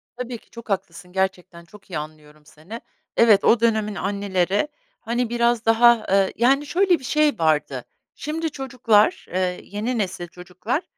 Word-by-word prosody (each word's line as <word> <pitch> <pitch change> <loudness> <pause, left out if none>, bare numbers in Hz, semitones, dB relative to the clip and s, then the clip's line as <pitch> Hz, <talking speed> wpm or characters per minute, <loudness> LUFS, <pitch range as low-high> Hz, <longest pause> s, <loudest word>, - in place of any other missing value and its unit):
Tabii 245 -1 -5
ki - - -26
çok 235 -1 -12
haklısın, 180 -2 -4
gerçekten 185 -2 -3
çok 205 +3 -18
iyi 175 - -4
anlıyorum 150 0 -10
seni. 170 +10 -11 0.4
Evet, 220 -4 +5
o 235 - +5
dönemin 215 -2 +1
anneleri, 195 +2 -1 0.3
hani, 240 +1 -2
biraz 235 -1 +1
daha, 230 0 +5
eee, 195 0 +2
yani, 270 +5 +3
şöyle 360 +3 +2
bir - - -15
şey 300 -1 +1
vardı, 155 -2 0 0.3
şimdi 320 +2 -3
çocuklar, 245 -6 +1
eee, 180 -1 -1
yeni 220 +5 -3
nesil 185 -4 -3
çocuklar 180 - -4
210 Hz, 155 wpm, -22 LUFS, 185-240 Hz, 0.4 s, Evet